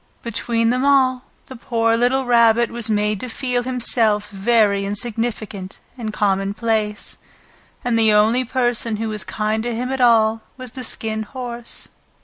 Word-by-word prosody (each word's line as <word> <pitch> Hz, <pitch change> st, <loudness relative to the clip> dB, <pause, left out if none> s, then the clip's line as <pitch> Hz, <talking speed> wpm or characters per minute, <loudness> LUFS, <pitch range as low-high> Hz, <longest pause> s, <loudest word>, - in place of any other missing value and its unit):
Between 230 Hz, 0 st, 0 dB
them 255 Hz, +1 st, 0 dB
all 260 Hz, -2 st, +3 dB, 0.2 s
the 260 Hz, -, -11 dB
poor 230 Hz, -1 st, 0 dB
little 250 Hz, +3 st, +1 dB
Rabbit 235 Hz, -1 st, +4 dB
was 235 Hz, -1 st, +2 dB
made 210 Hz, -1 st, 0 dB
to 250 Hz, -, -6 dB
feel 250 Hz, 0 st, -2 dB
himself 230 Hz, -4 st, +2 dB
very 205 Hz, 0 st, +2 dB
insignificant 210 Hz, -2 st, -3 dB, 0.2 s
and 225 Hz, -4 st, -5 dB
commonplace, 210 Hz, +2 st, -1 dB, 0.7 s
and 235 Hz, -2 st, +1 dB
the 220 Hz, -1 st, +4 dB
only 220 Hz, +4 st, +3 dB
person 240 Hz, -2 st, 0 dB
who 220 Hz, +1 st, -3 dB
was 210 Hz, -2 st, -2 dB
kind 215 Hz, +1 st, -2 dB
to 240 Hz, 0 st, -3 dB
him 250 Hz, +3 st, -3 dB
at 265 Hz, -1 st, -2 dB
all 225 Hz, -2 st, +4 dB, 0.2 s
was 255 Hz, -2 st, -8 dB
the 255 Hz, +1 st, -8 dB
Skin 220 Hz, -2 st, -4 dB
Horse. 240 Hz, +1 st, -7 dB
230 Hz, 150 wpm, -20 LUFS, 215-245 Hz, 0.7 s, Rabbit